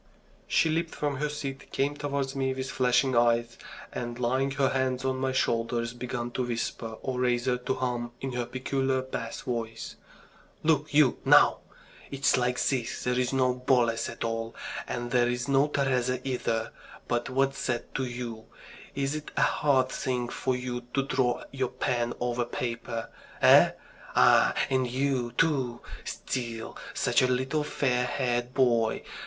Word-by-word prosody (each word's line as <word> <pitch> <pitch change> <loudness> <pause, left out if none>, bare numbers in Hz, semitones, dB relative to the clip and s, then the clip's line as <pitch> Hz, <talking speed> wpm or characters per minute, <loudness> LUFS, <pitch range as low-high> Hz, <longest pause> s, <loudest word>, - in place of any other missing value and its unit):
She - - +3
leaped 165 +1 -1
from 145 -2 -1
her 150 +2 -1
seat, 135 -2 -6
came 140 +2 0
towards 140 -2 -2
me 130 -1 0
with 130 +1 -4
flashing 125 +1 +2
eyes, 120 0 +3 0.4
and 120 -1 -4
laying 130 +3 +1
her 135 -1 +2
hands 130 -1 0
on 130 0 0
my 130 0 0
shoulders, 115 -2 0
began 120 -1 -4
to 130 - -1
whisper, 115 -1 -3
or 130 -1 -2
rather 125 0 +2
to 125 - -1
hum 120 -2 -2
in 135 - -4
her 120 -1 -2
peculiar 130 +1 -1
bass 115 -3 -5
voice: 115 -2 -4 0.7
"Look 150 -1 +2
you, 145 -4 +4
now! - - +6 0.5
It's 140 +1 +2
like 125 0 +1
this. 125 -4 -1
There's 125 0 +1
no 130 -2 +2
Boles 125 -3 +1
at - - -6
all, 115 0 -3 0.3
and 120 0 -4
there's 120 0 +1
no 140 +1 +4
Teresa 130 -3 0
either. 115 -3 -1 0.4
But 120 0 -1
what's 135 +1 0
that 120 -2 -2
to 135 - -1
you? 120 -3 -6 0.5
Is 140 0 0
it 155 -1 -5
a - - +3
hard 130 -3 +2
thing 125 -3 -2
for 130 +1 -1
you 125 -1 -4
to 135 - +2
draw 130 -2 0
your 130 -2 -1
pen 120 -1 -1
over 120 0 0
paper? 115 -1 -4 0.3
Eh? - - +7 0.4
Ah, - - +5
and 130 -1 +1
you, 130 -2 0
too! 130 -5 +1 0.2
Still 115 -3 -4 0.2
such - - +3
a 130 - +4
little 130 +4 0
fair 125 -4 0
haired 120 -1 -1
boy! 120 -4 +2
125 Hz, 155 wpm, -28 LUFS, 120-135 Hz, 0.7 s, Eh